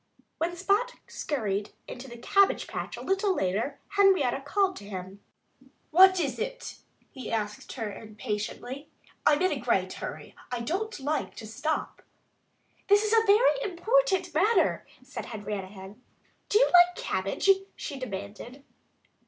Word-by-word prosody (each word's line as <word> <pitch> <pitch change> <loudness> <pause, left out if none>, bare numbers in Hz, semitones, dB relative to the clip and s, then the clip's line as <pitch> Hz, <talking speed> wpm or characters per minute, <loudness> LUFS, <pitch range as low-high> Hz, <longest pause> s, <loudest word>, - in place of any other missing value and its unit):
When 340 +2 -1
Spot 410 +7 +1
scurried 210 -8 -3
into 250 +2 -8
the 240 -1 -10
cabbage 395 +11 +3
patch - - -5
a - - -7
little 385 0 +1
later 195 - -1
Henrietta 380 -11 +4
Hen 275 - -12
called 385 +4 +1
to 205 - -10
him. 190 0 -7 0.7
"What 375 +3 +7
is 285 -5 -1
it?" - - -5 0.3
he 260 -4 -7
asked 210 -2 -3
her 220 -5 -4
impatiently. 220 +5 -5 0.4
"I'm 300 +4 +4
in 370 - +3
a - - -2
great - - 0
hurry. - - -7 0.2
I 245 -1 -2
don't 385 - -3
like 295 +3 -2
to 220 - -8
stop." 275 +9 -3 0.9
"This 410 +1 +5
is 430 +1 0
a 450 -1 +4
very 465 +5 +5
important 390 -2 +1
matter," 390 +4 +2 0.2
said 275 +2 -7
Henrietta 205 -3 -5
Hen. 195 +3 -12 0.5
"Do 415 - +4
you - - +6
like 355 0 +7
cabbage?" 190 - -2 0.3
she 280 -4 -6
demanded. 215 +4 -7
285 Hz, 145 wpm, -28 LUFS, -, 0.9 s, What